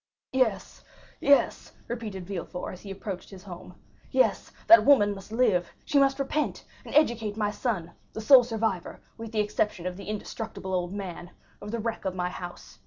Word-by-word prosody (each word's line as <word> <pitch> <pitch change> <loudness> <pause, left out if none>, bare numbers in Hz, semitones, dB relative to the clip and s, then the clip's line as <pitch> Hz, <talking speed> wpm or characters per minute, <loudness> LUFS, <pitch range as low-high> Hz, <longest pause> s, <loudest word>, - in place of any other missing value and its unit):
"Yes, 225 -7 0 0.4
yes," 280 0 +3
repeated 215 -6 -5
Villefort, 180 -1 -5
as 185 - -11
he 200 - -10
approached 195 -1 -6
his 190 -2 -12
home—"yes, 180 - -2 0.2
that 340 - +9
woman 210 -8 +5
must 195 +1 -11
live; 210 -8 +2
she 285 - +3
must 275 0 +3
repent, 285 +2 -2 0.2
and - - -8
educate 225 -8 +2
my 210 -1 0
son, 200 -7 -2 0.2
the - - -6
sole 250 +3 +8
survivor, 220 -6 -2 0.2
with 225 -1 -7
the 215 -2 +1
exception 210 -3 -1
of 180 0 -3
the 200 - -9
indestructible 215 -2 -5
old 180 -1 -1
man, 180 -3 -6 0.3
of 205 - -7
the 235 - -2
wreck 230 0 -3
of 185 -1 -2
my 180 -1 -1
house. 175 -1 -9
210 Hz, 175 wpm, -27 LUFS, 185-230 Hz, 0.4 s, that